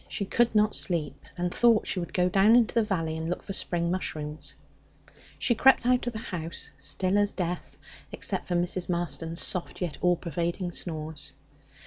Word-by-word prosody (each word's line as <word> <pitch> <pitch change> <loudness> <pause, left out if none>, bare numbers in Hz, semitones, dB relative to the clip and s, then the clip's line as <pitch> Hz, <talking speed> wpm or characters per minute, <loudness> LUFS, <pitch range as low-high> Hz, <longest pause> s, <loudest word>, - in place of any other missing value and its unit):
She 200 - -3
could 235 +3 +2
not 210 0 +3
sleep, 150 -6 -1
and 180 0 -1
thought 235 -3 +4
she 185 - -1
would 170 - -5
go 180 -1 +2
down 195 +4 +5
into 240 -3 +4
the 230 - +4
valley 165 -7 -1
and 160 +1 -3
look 180 - -3
for 195 - -5
spring 170 -2 0
mushrooms. 155 -4 -4 0.8
She 240 - +2
crept 260 +1 +5
out 250 0 +2
of 245 - -1
the - - -4
house, 170 -7 -5
still 185 +8 +1
as 205 0 +2
death, 180 -1 -4 0.3
except - - -1
for 175 - -1
Mrs. 175 +1 0
Marston's 165 -1 -1
soft 180 -2 -2
yet 175 -4 -4
all 180 0 +4
pervading 175 +2 -3
snores. 155 -4 -3
180 Hz, 180 wpm, -28 LUFS, 165-205 Hz, 0.8 s, down